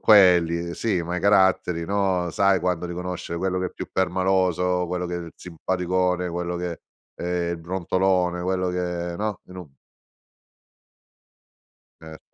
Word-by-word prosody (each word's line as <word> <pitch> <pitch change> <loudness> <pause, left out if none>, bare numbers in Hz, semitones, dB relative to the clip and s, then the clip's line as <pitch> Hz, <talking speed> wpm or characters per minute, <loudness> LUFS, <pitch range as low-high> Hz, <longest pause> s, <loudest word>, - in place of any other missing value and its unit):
quelli 85 -4 +5
sì, 105 -6 0
ma 90 +2 -3
i - - -2
caratteri, 95 -4 +3
no, 95 -2 0
sai 100 0 +3
quando 90 -1 -1
riconoscere 90 -1 -5
quello 95 0 -1
che 90 - -1
è - - -7
più - - -7
permaloso, 90 -1 +1
quello 90 0 -2
che 90 - -4
è - - -2
il 85 -1 -8
simpaticone, 90 +1 -1
quello 85 0 -3
che 85 -1 -4 0.3
è 90 -1 -2
i - - -3
brontolone, 90 +1 0
quello 90 0 0
che 90 -1 -3
no, 105 -1 -3
in 90 - -11
un 90 -5 -8 2.3
Cer 80 -1 -13
90 Hz, 145 wpm, -24 LUFS, 85-95 Hz, 2.3 s, quelli